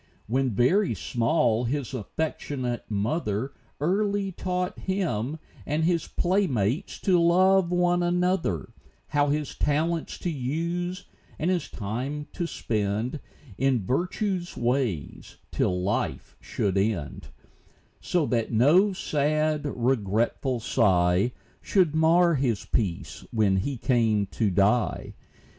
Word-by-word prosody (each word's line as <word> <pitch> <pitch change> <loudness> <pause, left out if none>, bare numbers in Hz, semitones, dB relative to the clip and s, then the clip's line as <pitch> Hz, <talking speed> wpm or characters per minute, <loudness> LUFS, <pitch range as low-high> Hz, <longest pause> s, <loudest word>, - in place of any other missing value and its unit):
When 130 +3 +1
very 130 - +2
small 120 -1 +1
his 140 +2 -2
affectionate 130 0 -3
mother 110 +3 -1 0.3
Early 200 +4 0
taught 180 0 -3
him 160 - -2 0.3
and 155 +2 -1
his 170 0 +1
playmates 175 - 0
to 180 -3 +3
love 185 +2 +4
one 175 0 +2
another 175 - 0 0.4
How 145 0 +2
his 150 0 -1
talents 160 +3 0
to 175 - -3
use, 170 +7 -3 0.3
and 170 +4 0
his 180 -2 -1
time 125 +8 -4
to 170 - -2
spend 110 +2 -2 0.4
In 130 -6 +1
virtue's 180 - -1
ways, 120 - -2
till 90 0 0
life 90 -8 -2
should 100 -1 -1
end; 100 -8 -2 0.7
So 175 -4 0
that 115 -4 -1
no 160 - +4
sad, 155 -2 0
regretful 120 -1 0
sigh 95 -2 +2 0.3
Should 180 -6 +2
mar 165 +2 +4
his 130 -7 0
peace, 95 -7 -2
when 105 -4 +2
he 130 +8 -2
came 115 -4 +2
to 110 -3 +1
die. 100 +5 +1
140 Hz, 115 wpm, -26 LUFS, 110-175 Hz, 0.7 s, love